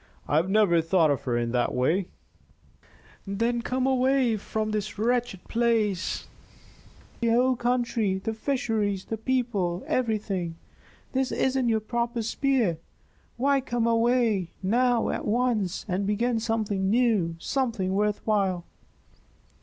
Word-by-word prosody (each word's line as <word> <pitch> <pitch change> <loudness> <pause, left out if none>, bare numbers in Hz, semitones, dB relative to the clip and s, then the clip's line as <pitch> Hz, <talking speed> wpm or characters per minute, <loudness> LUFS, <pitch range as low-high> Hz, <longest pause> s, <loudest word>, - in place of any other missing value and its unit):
"I 145 - +2
have 170 +4 +1
never 195 -5 +4
thought 165 -2 +3
of 140 - -2
her 120 -2 0
in 120 0 -1
that 125 0 0
way 170 +9 +1 0.6
" 200 +2 -8
"Then 235 0 +1
come 255 +2 -1
away 260 -2 +2
from 215 +1 -3
this 210 -1 -3
wretched 235 -3 0
place. 225 -5 0
I - - -17
detest - - -26
the 235 - +1
whole 250 +3 +3
country 235 -5 0
the 220 +4 -3
fisheries, 220 -6 -1
the 225 - -4
people, 220 -8 -1
everything. 205 -8 -1 0.6
This 265 0 0
isn't 260 -2 +1
your 220 -1 +1
proper 235 +1 -2
sphere. 235 - +1 0.6
Why 275 +2 +2
come 240 -3 -1
away, 230 -5 +2
now, 240 +4 +2
at - - -3
once, 215 -5 0
and 195 +1 -1
begin 230 +3 +1
something 215 -4 -1
new, 215 -8 +2
something 225 -2 -1
worth 210 +1 0
while?" 195 -5 +1
220 Hz, 140 wpm, -26 LUFS, 190-240 Hz, 0.6 s, never